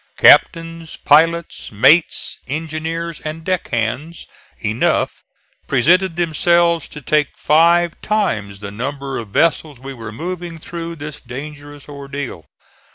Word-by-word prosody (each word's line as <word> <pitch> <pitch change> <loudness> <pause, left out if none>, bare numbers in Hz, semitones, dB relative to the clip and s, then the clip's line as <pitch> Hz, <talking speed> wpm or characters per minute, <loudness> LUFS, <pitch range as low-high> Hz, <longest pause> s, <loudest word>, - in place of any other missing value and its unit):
Captains, 165 -1 +4
pilots, 165 +3 +2
mates, 155 +11 +3
engineers 160 +3 -4
and 155 +1 -6
deck 185 0 -1
hands 130 +8 -3 0.4
enough 110 +2 0 0.4
presented 165 +7 +3
themselves 170 0 +2
to 150 - -11
take 150 +1 +1
five 170 +2 +4
times 110 - -1
the 100 -1 -6
number 135 +5 -4
of 115 - -7
vessels 150 +4 +1
we 135 +2 -8
were 115 -4 -8
moving 175 +6 -6
through 170 +1 -7
this 150 -1 -7
dangerous 145 +3 -9
ordeal. 140 - -7
155 Hz, 115 wpm, -18 LUFS, 135-170 Hz, 0.4 s, Captains